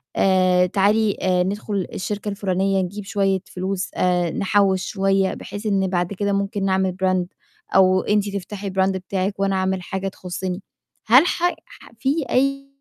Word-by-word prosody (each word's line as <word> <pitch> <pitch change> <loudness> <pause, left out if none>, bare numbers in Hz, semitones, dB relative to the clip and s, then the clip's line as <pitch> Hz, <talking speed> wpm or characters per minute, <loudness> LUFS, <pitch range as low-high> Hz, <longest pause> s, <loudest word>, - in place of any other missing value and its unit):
آآ، 185 -1 +4
تعالي 205 +3 +2 0.3
ندخُل 200 -1 -2
الشركة 205 +2 -3
الفُلانية 195 -1 0
نجيب 200 +3 -6
شوية 195 -2 +1
فلوس 190 +1 -3
آآ، 180 -2 +1
نحول 195 -1 +2
شوية 195 -1 +1
بحيث 205 +2 -8
إن 195 -2 +1
بعد 180 0 -1
كده 200 +1 -1
ممكن 200 0 -1
نعمل 190 -1 +1
brand 185 -1 +2 0.5
أو 185 -1 +5
أنتِ 210 -1 +1
تفتحي 200 +1 -5
brand 190 0 +2
بتاعك 190 +1 -3
وأنا 195 0 +1
أعمل 190 0 0
حاجة 190 +2 -4
تخُصّني؟ 185 0 -5 0.4
هل 255 +8 +7
ح 345 - -2 0.2
ح - - -16
في 280 +4 0
أي 275 +1 +1
195 Hz, 150 wpm, -22 LUFS, 185-205 Hz, 0.5 s, هل